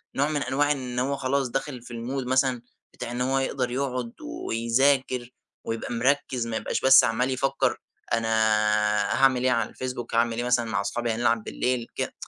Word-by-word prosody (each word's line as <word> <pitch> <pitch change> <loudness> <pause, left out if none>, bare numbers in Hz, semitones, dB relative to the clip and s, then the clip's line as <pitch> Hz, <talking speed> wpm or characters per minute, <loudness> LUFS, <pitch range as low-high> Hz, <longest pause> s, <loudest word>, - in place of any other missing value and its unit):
نوع 140 +2 +1
من 150 -2 -1
أنواع 145 +3 +1
إن 125 -3 -2
هو 140 +2 0
خلاص 135 -1 0
داخل 135 -1 -3
في 120 - -13
المود 125 +3 -4
مثلًا 130 -2 +2 0.3
بتاع 120 - -6
إن 120 +1 -3
هو 135 +1 +1
يقدر 130 -2 -1
يقعد 125 -3 -2
ويذاكر 125 +2 0 0.3
ويبقى 115 +1 -4
مركِز، 125 -1 0
ما 110 - -2
يبقاش - - -2
بس 135 0 +8
عمال 120 +2 +1
يفكر 135 +1 0 0.4
أنا 115 0 +1 1.0
هاعمل 130 -2 +4
إيه 130 - +3
على 115 -3 0
الFacebook، 125 -2 -5
هاعمل 115 0 +2
إيه 120 - -1
مثلًا 125 -1 +2
مع 100 -3 -1
صحابي 120 +3 -2
هنلعب 115 0 +1
بالليل 125 0 -2
كده - - -3
125 Hz, 175 wpm, -26 LUFS, 115-135 Hz, 1.0 s, بس